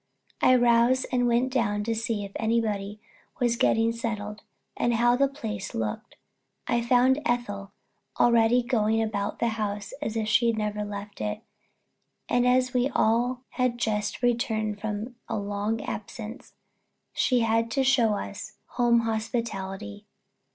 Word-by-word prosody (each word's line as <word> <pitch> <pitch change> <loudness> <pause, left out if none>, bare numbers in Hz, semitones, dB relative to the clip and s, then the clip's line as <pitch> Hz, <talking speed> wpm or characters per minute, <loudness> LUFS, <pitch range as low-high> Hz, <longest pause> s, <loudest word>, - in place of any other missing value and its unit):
I 255 - +6
rose 240 +1 +4
and 245 -1 +2
went 245 +2 +1
down 210 -5 +1
to 230 +2 -1
see 225 -2 -2
if 200 - -10
everybody 215 -3 -1 0.4
was 240 -2 +2
getting 225 -1 +3
settled, 215 -3 -4 0.3
and 240 -1 +1
how 240 +1 +4
the 275 +2 +3
place 230 -6 -6
looked. 110 -1 -4 0.5
I 235 0 +1
found 250 +4 +3
Ethel 205 -7 -2 0.5
already 235 +1 +4
going 225 -3 +1
about 215 -2 -2
the 235 - +1
house 205 -1 -3
as 225 -6 -3
if 220 -1 -1
she 235 +2 +3
had 230 -1 +1
never 210 -1 -2
left 205 - -7
it, 105 -1 -3 0.9
and 245 0 +2
as 255 0 +3
if - - -20
we 250 +1 +2
all 245 +1 +1
had 250 -2 0
just 210 -1 -2
returned 220 -4 0
from 220 +3 -4
a - - -1
long 205 +2 -2
absence 220 +1 -7
and - - -21
she 250 -2 +3
had 230 0 +1
to 270 +4 +1
show 245 -5 +3
us - - -6 0.2
home 240 -1 +3
hospitality. 215 - -4
230 Hz, 150 wpm, -27 LUFS, 210-245 Hz, 0.9 s, I